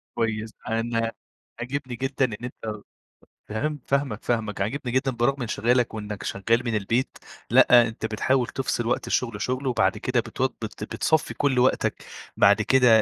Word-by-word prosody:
كويس. 110 -1 -1 0.2
أنا 115 0 0 0.5
عاجبني 130 0 -4
جدًا 135 +2 0
إن 115 - -4
أنت 110 -4 -6 0.7
فهمت 145 +8 -2
فاهمك، 140 -5 0
فاهمك. 110 -4 -1
عاجبني 125 +4 -2
جدًا 130 +1 +1
برغم 125 +3 0
انشغالك 120 +1 +1
وإنّك 105 -1 -5
شغّال 115 +5 0
من 115 -2 0
البيت 115 +5 -1 0.3
لأ، 120 -1 +7
أنت 110 0 -5
بتحاول 120 +3 +1
تفصِل 130 -3 -2
وقت 120 - -1
الشغل 115 -4 -1
شُغل 130 +2 -2
وبعد 115 -3 +2
كده - - 0
بتو - - -1
بت - - -8
بتصفِّي 160 -1 0
كل 135 -3 +1
وقتك 130 - +1 0.3
بعد 100 +2 +5
كده 120 -2 +5
120 Hz, 150 wpm, -25 LUFS, 110-130 Hz, 0.7 s, لأ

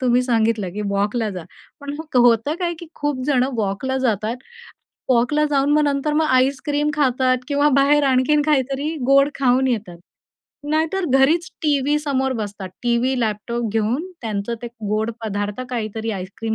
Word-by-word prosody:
तुम्ही 250 -1 +3
सांगितलं 225 -5 +1
की 210 +1 -4
वॉकला 205 +3 0
जा. 180 -4 -7 0.4
पण 285 0 -6 0.2
होतं 240 +4 +4
काय 345 -1 -1
की 340 - -9
खूप 290 -3 -2
जण 260 -4 +3
वॉकला 220 +6 -1
जातात. 225 -2 -1 0.7
वॉकला 260 +5 +2
जाऊन 280 0 +2
मग 300 0 +4
नंतर 285 +1 0
मग 315 0 +2
आईस्क्रीम 280 +3 +1
खातात 255 -3 +2
किंवा 285 +1 +3
बाहेर 290 +1 +4
आणखीन 270 +3 +3
काहीतरी 285 +1 0
गोड 275 +1 +5
खाऊन 260 0 +3
येतात. 205 -8 -3 0.7
नाहीतर 325 +4 0
घरीच 325 +6 +3
टीव्ही 290 0 +2
समोर 265 -3 -1
बसतात. 205 -3 -5
टीव्ही, 240 +2 +1
लॅपटॉप 225 +2 -2
घेऊन 240 - -1
त्यांचं 215 +1 -3
ते - - -4 0.2
गोड 215 +2 0
पदार्थ 205 +2 -3
काहीतरी 225 -1 -3
आईस्क्रीम 200 +4 -4
255 Hz, 150 wpm, -21 LUFS, 220-285 Hz, 0.7 s, गोड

